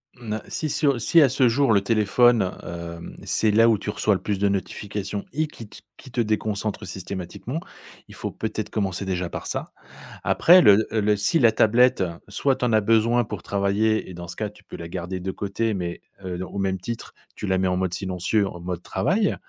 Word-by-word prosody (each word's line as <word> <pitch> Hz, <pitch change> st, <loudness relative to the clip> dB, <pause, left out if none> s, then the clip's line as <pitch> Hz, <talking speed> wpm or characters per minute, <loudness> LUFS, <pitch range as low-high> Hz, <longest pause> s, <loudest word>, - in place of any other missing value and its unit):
Ne 110 Hz, -3 st, -4 dB
si 155 Hz, -, -3 dB
si 150 Hz, +1 st, +1 dB
au 140 Hz, -, +3 dB
si 165 Hz, +7 st, +4 dB
à 140 Hz, -, +6 dB
ce 130 Hz, 0 st, +3 dB
jour, 130 Hz, +2 st, +3 dB
le 100 Hz, -2 st, +4 dB
téléphone, 115 Hz, +2 st, +3 dB, 0.2 s
hem, 85 Hz, -1 st, -7 dB
c'est 110 Hz, -, +2 dB
là 115 Hz, +2 st, +5 dB
où 110 Hz, -, +3 dB
tu 105 Hz, -, -4 dB
reçois 105 Hz, 0 st, +1 dB
le -, -, -4 dB
plus 100 Hz, -2 st, -2 dB
de 100 Hz, 0 st, +2 dB
notification 100 Hz, +1 st, -3 dB
et 155 Hz, +3 st, +1 dB
qui 120 Hz, -7 st, -11 dB
t -, -, -12 dB, 0.2 s
qui 130 Hz, -, -13 dB
te 120 Hz, -, 0 dB
déconcentre 105 Hz, -2 st, -2 dB
systématiquement, 95 Hz, -, -5 dB, 0.5 s
il -, -, -13 dB
faut -, -, -4 dB
peut-être -, -, -4 dB
commencer, 100 Hz, -3 st, -2 dB
déjà, 90 Hz, -2 st, -2 dB
par -, -, -6 dB
ça. -, -, -4 dB, 0.5 s
Après 180 Hz, +2 st, +6 dB
le 105 Hz, 0 st, +6 dB
le 105 Hz, -1 st, +2 dB
si 105 Hz, +11 st, +2 dB
la 115 Hz, -5 st, +5 dB
tablette, 115 Hz, 0 st, +4 dB, 0.2 s
soit 130 Hz, +6 st, +1 dB
tu 125 Hz, -, -2 dB
en 120 Hz, -, +1 dB
as 110 Hz, -, +4 dB
besoin 115 Hz, +3 st, +3 dB
pour 105 Hz, -5 st, -7 dB
travailler 100 Hz, +2 st, 0 dB
et -, -, -8 dB
dans 85 Hz, 0 st, -8 dB
ce -, -, -7 dB
cas 105 Hz, -1 st, -3 dB
tu 105 Hz, 0 st, -20 dB
peux -, -, -10 dB
la 85 Hz, -, -7 dB
garder 90 Hz, +1 st, -5 dB
de 95 Hz, +1 st, -3 dB
côté 105 Hz, +3 st, -2 dB
mais 85 Hz, -2 st, -4 dB, 0.2 s
heu, 90 Hz, 0 st, -4 dB
au 95 Hz, -, -8 dB
même 95 Hz, -1 st, -1 dB
titre, 115 Hz, +5 st, -6 dB, 0.2 s
tu -, -, -5 dB
la 95 Hz, -1 st, +1 dB
mets 95 Hz, -, +1 dB
en 90 Hz, 0 st, 0 dB
mode 95 Hz, -1 st, -1 dB
silencieux, 95 Hz, +2 st, 0 dB
en 85 Hz, -, -8 dB
mode 90 Hz, 0 st, -4 dB
travail 190 Hz, -, 0 dB
105 Hz, 220 wpm, -24 LUFS, 95-115 Hz, 0.5 s, à